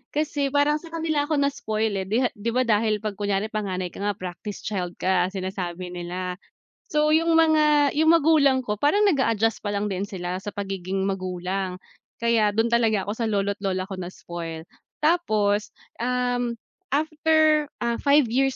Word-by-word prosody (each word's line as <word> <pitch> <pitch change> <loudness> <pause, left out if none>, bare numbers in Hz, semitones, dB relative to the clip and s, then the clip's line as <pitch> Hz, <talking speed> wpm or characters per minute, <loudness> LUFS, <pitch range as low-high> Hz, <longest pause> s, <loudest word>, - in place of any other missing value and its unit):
kasi 295 -2 0
parang 290 +2 +2
sa 335 - -12
kanila 315 -3 0
ako 315 - -1
na-spoil, 220 -6 -1
eh, 190 - -4
'di 240 +5 +1
'di 225 +3 -1
ba 255 - +3
dahil 215 -2 +1
pag 210 -2 -4
kunyari 205 +1 -1
panganay 185 -4 -3
ka - - -11
nga 205 0 -1
practice 185 +2 -7
child 180 -4 -3
ka 180 -1 +1
sinasabi 185 -2 -5
nila. 180 +1 -5 0.5
So 305 0 +3
yung 330 +1 +2
mga 305 -3 +4
yung 315 +2 +5
magulang 300 -5 +4
ko 215 -5 -2
parang 350 - +3
nag-a-adjust 230 - +1
pa 205 - -2
lang 205 0 -1
din 195 -1 -2
sila 180 -2 -4
sa 205 - -4
pagiging 195 -1 -3
magulang, 185 0 -3 0.5
kaya 220 -3 +3
dun 225 +1 +2
talaga 225 -4 +2
ako 205 - -3
sa 230 - 0
lolo't 200 -1 -1
lola 190 -2 -1
ko 190 0 -7
na-spoil. 170 -2 -7 0.4
Tapos, 215 -11 +1 0.2
um, 245 0 0 0.4
after, 310 0 +3 0.2
ah, 235 0 -1
5 270 -2 +3
215 Hz, 160 wpm, -24 LUFS, 190-285 Hz, 0.5 s, yung